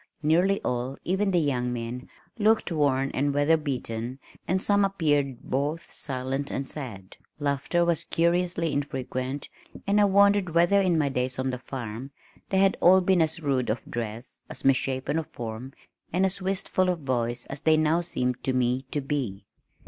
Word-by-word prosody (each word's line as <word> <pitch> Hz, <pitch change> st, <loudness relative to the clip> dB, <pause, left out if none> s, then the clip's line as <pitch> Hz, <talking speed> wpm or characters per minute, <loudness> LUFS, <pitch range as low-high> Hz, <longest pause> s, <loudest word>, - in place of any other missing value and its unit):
Nearly 180 Hz, +6 st, +3 dB
all, 125 Hz, +2 st, -2 dB
even 190 Hz, +3 st, +1 dB
the 185 Hz, -, +2 dB
young 125 Hz, -5 st, 0 dB
men, 120 Hz, +1 st, -5 dB, 0.3 s
looked 215 Hz, -2 st, +3 dB
worn 140 Hz, -4 st, +1 dB
and 140 Hz, +1 st, 0 dB
weather 145 Hz, +3 st, +4 dB
beaten 125 Hz, -5 st, -3 dB, 0.3 s
and 185 Hz, +2 st, +1 dB
some 200 Hz, +1 st, +3 dB
appeared 145 Hz, -9 st, 0 dB
both 150 Hz, +5 st, -2 dB
silent 135 Hz, +1 st, -1 dB
and 135 Hz, 0 st, -3 dB
sad. 105 Hz, -10 st, -6 dB, 0.2 s
Laughter 145 Hz, +4 st, 0 dB
was 170 Hz, -1 st, +1 dB
curiously 170 Hz, -1 st, +1 dB
infrequent 135 Hz, -1 st, -3 dB, 0.4 s
and 205 Hz, +1 st, +3 dB
I -, -, +6 dB
wondered 200 Hz, -3 st, +4 dB
whether 175 Hz, +4 st, +5 dB
in 180 Hz, -3 st, +2 dB
my 145 Hz, -3 st, +2 dB
days 125 Hz, -1 st, -2 dB
on 130 Hz, 0 st, -1 dB
the 125 Hz, -, -4 dB
farm 125 Hz, -1 st, -6 dB, 0.4 s
they 190 Hz, -, +1 dB
had 195 Hz, 0 st, +4 dB
all 185 Hz, +2 st, +7 dB
been 185 Hz, -1 st, +3 dB
as 160 Hz, +1 st, 0 dB
rude 135 Hz, -4 st, 0 dB
of 110 Hz, +3 st, -2 dB
dress, 115 Hz, +1 st, -5 dB
as -, -, -6 dB
misshapen 135 Hz, +2 st, +1 dB
of 160 Hz, -, -5 dB
form 120 Hz, +2 st, -7 dB, 0.4 s
and 185 Hz, +3 st, +2 dB
as 190 Hz, +1 st, -1 dB
wistful 185 Hz, -1 st, 0 dB
of 175 Hz, -3 st, -1 dB
voice 120 Hz, -3 st, -1 dB
as 140 Hz, +1 st, -6 dB
they 160 Hz, -1 st, +4 dB
now 155 Hz, +2 st, +2 dB
seemed 125 Hz, -7 st, -2 dB
to 130 Hz, -, 0 dB
me 125 Hz, +1 st, 0 dB
to 145 Hz, -, -2 dB
be. 130 Hz, -9 st, -3 dB
145 Hz, 170 wpm, -26 LUFS, 130-175 Hz, 0.4 s, all